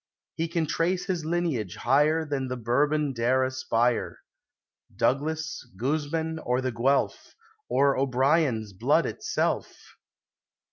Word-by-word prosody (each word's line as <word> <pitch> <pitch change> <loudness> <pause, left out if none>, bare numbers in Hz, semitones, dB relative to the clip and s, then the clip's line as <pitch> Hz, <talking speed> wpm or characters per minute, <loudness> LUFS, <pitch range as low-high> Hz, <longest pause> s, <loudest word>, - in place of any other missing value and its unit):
He 165 - -2
can 165 -1 -1
trace 180 +4 0
his 180 -5 -2
lineage 160 - -1
higher 150 +6 +2
Than 140 -3 -2
the 125 0 -4
Bourbon 145 +5 +1
dare 125 +2 +2
aspire, 130 -2 0 0.4
— - - -34
Douglas, 160 +4 0
Guzman, 155 +5 -1
or 125 -3 0
the 130 0 -1
Guelph, 130 +5 0 0.3
Or 140 0 +3
O'Brien's 130 -4 +1
blood 95 - +2
itself - - -2
140 Hz, 120 wpm, -27 LUFS, 125-160 Hz, 0.4 s, Or